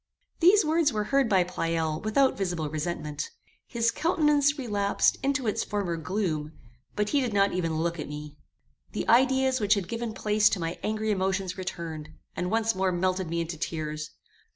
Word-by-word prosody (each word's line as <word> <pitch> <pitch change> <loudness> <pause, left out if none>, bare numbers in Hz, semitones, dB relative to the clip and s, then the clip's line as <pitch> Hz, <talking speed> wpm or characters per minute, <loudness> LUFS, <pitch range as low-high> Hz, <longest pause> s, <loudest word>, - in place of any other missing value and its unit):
These 380 +3 +6
words 315 -1 +3
were 210 -2 -1
heard 275 -4 +4
by 190 -4 +4
Pleyel 165 -3 -1
without 260 +5 +2
visible 175 -5 -2
resentment. 155 -1 -3 0.4
His 230 -1 +1
countenance 295 -1 +2
relapsed 205 -6 +1
into 275 -1 0
its 215 - 0
former 200 -5 -2
gloom; 160 -3 -2 0.4
but 210 0 0
he 285 - +2
did 245 -4 -2
not 200 0 +3
even 165 -3 -1
look 170 +1 -1
at 150 - -5
me. 150 0 -7 0.6
The - - -3
ideas 260 +2 +4
which 210 0 +3
had 195 -4 -3
given 230 -1 -4
place 210 -1 +3
to 200 - -1
my 165 0 -3
angry 215 0 -1
emotions 190 -1 -1
returned, 165 -5 -6 0.3
and 180 - -2
once 225 +1 +1
more 190 -1 0
melted 185 0 0
me 170 0 -1
into 165 0 -4
tears. 155 -1 -4
195 Hz, 175 wpm, -27 LUFS, 165-230 Hz, 0.6 s, These